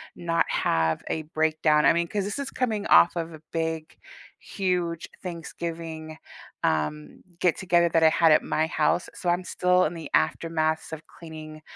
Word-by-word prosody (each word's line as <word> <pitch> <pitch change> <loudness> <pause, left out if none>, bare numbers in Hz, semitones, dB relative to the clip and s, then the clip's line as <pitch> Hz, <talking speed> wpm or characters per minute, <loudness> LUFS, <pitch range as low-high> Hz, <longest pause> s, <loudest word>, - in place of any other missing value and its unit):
not 170 -1 0
have 80 -1 +1
a 160 - -2
breakdown, 155 -1 +2
I - - +6
mean, 170 0 0
'cause 200 +2 -2
this 205 +5 -4
is 280 - -4
coming 220 -5 -1
off 175 - +6
of 165 -1 -4
a 155 - -11
big, 160 -1 -3 0.4
huge 180 -4 -2 0.2
Thanksgiving, 165 -2 -6 0.5
um, 75 -1 -2 0.2
get-together 175 -1 +2
that 165 0 +2
I 160 - +8
had 165 0 +4
at 155 - +5
my 160 +1 0
house, 160 +2 0
so 175 - -2
I'm 175 +1 +1
still 180 +1 +2
in 155 - -2
the 160 -3 -7
aftermaths 160 - 0
of 160 0 -8
cleaning 155 -2 -11
165 Hz, 165 wpm, -26 LUFS, 155-175 Hz, 0.5 s, I